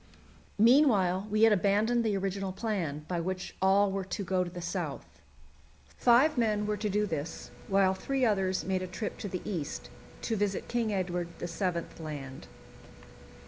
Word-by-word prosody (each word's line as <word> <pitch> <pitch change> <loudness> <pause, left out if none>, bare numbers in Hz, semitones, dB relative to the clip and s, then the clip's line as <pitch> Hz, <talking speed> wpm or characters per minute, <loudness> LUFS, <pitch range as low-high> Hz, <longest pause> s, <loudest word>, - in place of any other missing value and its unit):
Meanwhile 210 -6 +4
we 215 +1 +2
had 225 -1 +7
abandoned 210 +5 +2
the 210 -3 +1
original 195 0 -2
plan, 185 -8 -3
by 175 -2 -1
which 185 +2 -4
all 195 +1 +4
were 195 0 -2
to 195 +2 -4
go 185 -1 +1
to 175 - -5
the 175 0 -8
south. 175 0 -4 0.9
Five 250 +4 +4
men 210 -2 +1
were 210 0 0
to 210 +1 -2
do 210 +1 +1
this, 160 -4 -5 0.2
while 195 -1 +3
three 265 +7 -1
others 190 -4 +1
made 190 -1 0
a 185 - -4
trip 210 +4 -5
to 205 - -4
the 185 -1 -4
east, 170 -8 -4 0.3
to 225 - 0
visit 205 -1 -1
King 235 -2 0
Edward 180 -3 -1
VII. 175 0 -2 0.2
Land. 140 -4 -7
195 Hz, 165 wpm, -30 LUFS, 180-215 Hz, 0.9 s, had